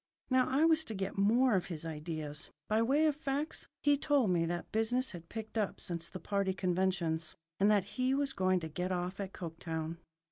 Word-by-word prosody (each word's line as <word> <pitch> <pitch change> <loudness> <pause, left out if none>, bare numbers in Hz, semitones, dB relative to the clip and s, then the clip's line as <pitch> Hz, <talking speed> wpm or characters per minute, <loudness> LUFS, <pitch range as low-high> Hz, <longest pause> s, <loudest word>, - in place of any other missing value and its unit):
Now 255 -1 +4
I 280 +5 +4
was 320 -1 +4
to 220 - -5
get 195 0 -3
more 230 +5 +4
of 185 -3 +1
his 165 -3 -5
ideas. 155 -1 -5 0.2
By 215 +1 +2
way 280 +7 +3
of 305 -2 +3
facts, 290 +1 -3 0.2
he 290 -1 +4
told 280 -10 +3
me 165 -2 +2
that 175 +1 -3
business 240 +4 +1
had 170 -2 -10
picked 220 0 -4
up 205 - -1
since 170 -1 -3
the 185 - -7
party 195 +1 0
conventions, 175 -3 0 0.2
and 200 +2 +5
that 205 -3 +4
he 255 +6 0
was 280 -1 0
going 185 -1 +2
to 160 - -3
get 180 +4 -3
off 180 +2 -2
at 195 -1 -3
Coketown. 165 -1 -5
190 Hz, 205 wpm, -33 LUFS, 170-255 Hz, 0.2 s, and